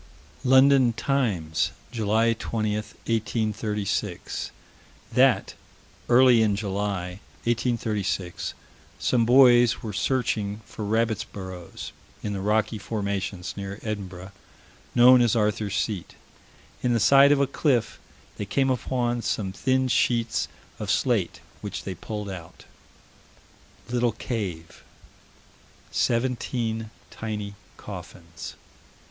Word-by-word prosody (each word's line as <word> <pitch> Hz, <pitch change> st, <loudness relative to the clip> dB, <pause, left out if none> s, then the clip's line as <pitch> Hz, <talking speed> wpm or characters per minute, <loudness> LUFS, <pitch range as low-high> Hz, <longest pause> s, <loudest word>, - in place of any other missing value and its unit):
London 130 Hz, -1 st, +6 dB
Times, 105 Hz, -, 0 dB, 0.2 s
July 115 Hz, 0 st, +2 dB
20, 110 Hz, -1 st, -2 dB
1836: 105 Hz, -3 st, -2 dB, 0.6 s
That, -, -, +4 dB, 0.6 s
early 125 Hz, -1 st, +6 dB
in 105 Hz, -2 st, +3 dB
July, 100 Hz, -2 st, -3 dB, 0.2 s
1836, 110 Hz, -6 st, -1 dB, 0.4 s
some 115 Hz, -3 st, +2 dB
boys 120 Hz, -1 st, +6 dB
were 110 Hz, -2 st, -4 dB
searching 110 Hz, -4 st, -1 dB
for 105 Hz, +1 st, -6 dB
rabbits' 110 Hz, 0 st, +1 dB
burrows 95 Hz, -3 st, -8 dB, 0.3 s
in 105 Hz, -, -2 dB
the 100 Hz, -, -3 dB
rocky 110 Hz, +1 st, +1 dB
formation, 100 Hz, -3 st, -3 dB
near 100 Hz, 0 st, -5 dB
Edinburgh, 95 Hz, -3 st, -5 dB, 0.6 s
known 125 Hz, +1 st, +8 dB
as 120 Hz, -2 st, +3 dB
Arthur's 105 Hz, -2 st, 0 dB
Seat. 100 Hz, -6 st, -3 dB, 0.7 s
In 125 Hz, -1 st, +2 dB
the 115 Hz, -, +2 dB
side 140 Hz, +5 st, +7 dB
of 145 Hz, -, +4 dB
a 140 Hz, -, +4 dB
cliff, 130 Hz, -3 st, 0 dB, 0.4 s
they 105 Hz, -, -3 dB
came 135 Hz, +6 st, +1 dB
upon 120 Hz, -1 st, -1 dB
some 100 Hz, -4 st, -1 dB
thin 130 Hz, +6 st, +1 dB
sheets 120 Hz, -2 st, +1 dB, 0.3 s
of -, -, -4 dB
slate, -, -, +1 dB, 0.2 s
which -, -, -5 dB
they 95 Hz, -, -4 dB
pulled 105 Hz, +3 st, -6 dB
out. 90 Hz, -4 st, -9 dB, 1.2 s
Little 120 Hz, -1 st, +1 dB
cave. 95 Hz, -9 st, -5 dB, 1.1 s
Seventeen 115 Hz, -2 st, -1 dB, 0.2 s
tiny 105 Hz, -2 st, -5 dB, 0.2 s
coffins. 85 Hz, -1 st, -9 dB
110 Hz, 105 wpm, -26 LUFS, 100-120 Hz, 1.2 s, known